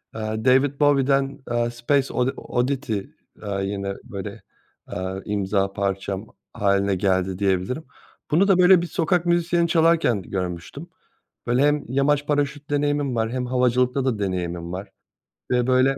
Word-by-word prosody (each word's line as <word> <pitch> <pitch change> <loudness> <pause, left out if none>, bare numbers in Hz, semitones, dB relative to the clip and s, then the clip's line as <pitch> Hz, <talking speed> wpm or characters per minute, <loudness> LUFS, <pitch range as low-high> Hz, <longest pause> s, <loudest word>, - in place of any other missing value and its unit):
eee, 110 - -4 0.2
David 135 +2 +3
Bowie'den, 140 -1 +2
eee, 120 0 +1
Space 130 +4 0
Odi 125 +1 +1
Oddity, 130 -2 -1 0.4
eee, 100 -1 -3
yine 100 0 -3
böyle, 100 -2 -7 0.5
eee, 95 +1 -4
imza 100 -1 0
parçam 100 +1 -2 0.3
hâline 100 -2 +1
geldi 95 0 0
diyebilirim. 100 - 0 0.5
Bunu 175 +6 +4
da 195 -3 +5
böyle 180 -1 +6
bir 175 - -3
sokak 170 +1 0
müzisyeni 170 0 +2
çalarken 165 - +3
görmüştüm. 90 -3 -5 0.6
Böyle, 120 +2 +2
hem 145 0 +2
yamaç 145 +2 +2
paraşüt 145 0 -1
deneyimim 145 -2 0
var 115 0 0
hem 125 0 -2
havacılıkta 125 +1 +1
da 120 -5 0
deneyimim 90 -3 -3
var 95 +2 -6 0.6
ve 125 -1 +2
böyle 130 +1 +3
125 Hz, 140 wpm, -23 LUFS, 100-145 Hz, 0.6 s, böyle